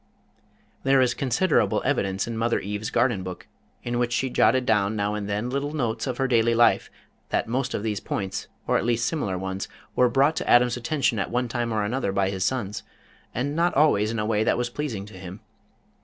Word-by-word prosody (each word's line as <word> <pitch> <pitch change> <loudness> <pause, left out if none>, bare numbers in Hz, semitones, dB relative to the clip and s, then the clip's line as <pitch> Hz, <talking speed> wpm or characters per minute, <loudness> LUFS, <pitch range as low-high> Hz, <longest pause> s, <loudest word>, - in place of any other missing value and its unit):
There 135 0 +4
is 125 -1 +3
considerable 135 +9 +1
evidence 95 0 0
in 115 - -5
Mother 115 +1 +1
Eve's 105 +2 -4
Garden 120 -7 +1
Book, 90 -1 -7 0.4
in 120 0 -2
which 120 -1 0
she 130 +2 0
jotted 130 0 +3
down 105 -2 +2
now 105 0 0
and 105 -1 -4
then 105 +4 -1
little 140 +2 -2
notes 120 -5 -2
of 125 -2 -2
her 135 - +1
daily 115 -2 +3
life 120 +1 +4 0.4
that - - 0
most 130 +3 -1
of 100 - -3
these 105 -3 -1
points, 100 +1 -4 0.2
or - - +2
at - - -3
least 115 0 +1
similar 115 - -1
ones, 95 +1 -4 0.3
were 125 -1 +4
brought 140 +5 +3
to - - -2
Adam's 120 0 +5
attention 125 -2 0
at 100 - -1
one 125 +1 0
time 120 -1 -2
or 110 -1 0
another 110 0 -1
by 95 0 +1
his 95 -2 -2
sons, 105 -4 -2 0.5
and 140 +5 -1
not 170 +2 +1
always 135 -8 +4
in 115 - -3
a 105 - -1
way 110 -1 +1
that - - +2
was 120 0 -2
pleasing 120 -9 -4
to 105 -3 -12
him. 95 +2 -8
115 Hz, 215 wpm, -25 LUFS, 105-130 Hz, 0.5 s, Adam's